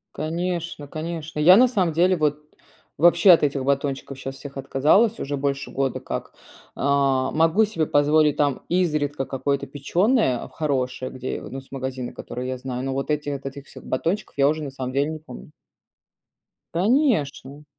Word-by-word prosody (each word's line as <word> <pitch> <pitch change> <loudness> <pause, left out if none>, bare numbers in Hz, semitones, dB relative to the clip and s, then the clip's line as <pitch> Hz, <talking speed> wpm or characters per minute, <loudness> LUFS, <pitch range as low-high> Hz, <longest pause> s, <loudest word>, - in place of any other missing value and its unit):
Конечно, 170 -1 -3
конечно, 160 0 -5
я, 180 +5 +8
на 255 +2 +6
самом 190 -9 0
деле, 180 +3 +3
вот 150 -1 +1 0.6
вообще 175 +3 +6
от 170 - +6
этих 140 -2 0
батончиков 140 0 -2
щас 135 0 -6
всех 140 -1 -9
отказалась 150 - +2
уже 140 +1 -3
больше 140 0 -2
года 135 -2 -1
как. - - -6 0.4
А, 135 -1 +2
могу 165 +7 +3
себе 180 -7 -1
позволить 150 +1 +3
там 145 -3 0
изредка 150 -6 0
какое-то 140 +1 -2
печеное 150 - +1
хорошее, 130 -4 -2
где, 130 0 -5
ну, 135 0 -7
с 135 - -21
магазина, 130 -2 -5
которые 125 +1 -6
я 130 - -3
знаю, 125 0 -5
ну, 135 - -2
вот 135 +3 -2
эти 150 -1 -1
от 140 -1 -5
этих 135 0 -7
всех - - -13
батончиков 170 +10 -2
я 140 0 +4
уже 155 +1 0
на 140 - -5
самом 130 -1 -5
деле 140 +3 +1
не 155 - -6
помню. 60 - -12 1.2
Конечно! 170 - 0
145 Hz, 165 wpm, -23 LUFS, 135-165 Hz, 1.2 s, я